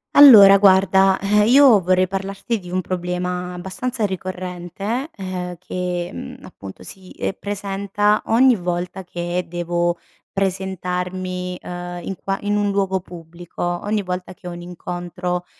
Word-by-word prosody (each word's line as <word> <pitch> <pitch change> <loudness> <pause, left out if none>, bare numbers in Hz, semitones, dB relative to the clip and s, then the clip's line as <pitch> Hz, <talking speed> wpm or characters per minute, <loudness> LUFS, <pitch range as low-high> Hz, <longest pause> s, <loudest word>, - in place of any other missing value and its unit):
Allora, 210 -9 +10
guarda, 190 -1 +5
eh, 210 +1 +2
io 255 -4 +7
vorrei 185 +1 +3
parlarti 195 +4 -3
di 180 -2 -11
un 185 +1 -1
problema 180 0 -3
abbastanza 210 +7 -3
ricorrente, 185 - -4
ehm, 185 -2 -5
che, 180 0 -4
mhmm, 85 - -9
appunto 95 -1 -11
si, 190 -1 -12
ehm, - - -3
presenta 200 +1 -1
ogni 245 +1 +4
volta 180 +1 -4
che 175 0 -3
devo 175 0 -1 0.4
presentarmi, 185 -1 -3
uhm, 175 0 -6
in 195 - -4
qua 195 0 -2
in 205 0 0
un 205 -1 +1
luogo 195 -1 0
pubblico, 170 -1 -9 0.2
ogni 210 0 0
volta 180 0 -5
che 180 - -12
ho 175 - -5
un 175 0 -8
incontro, 180 0 -5
185 Hz, 140 wpm, -21 LUFS, 180-195 Hz, 0.4 s, Allora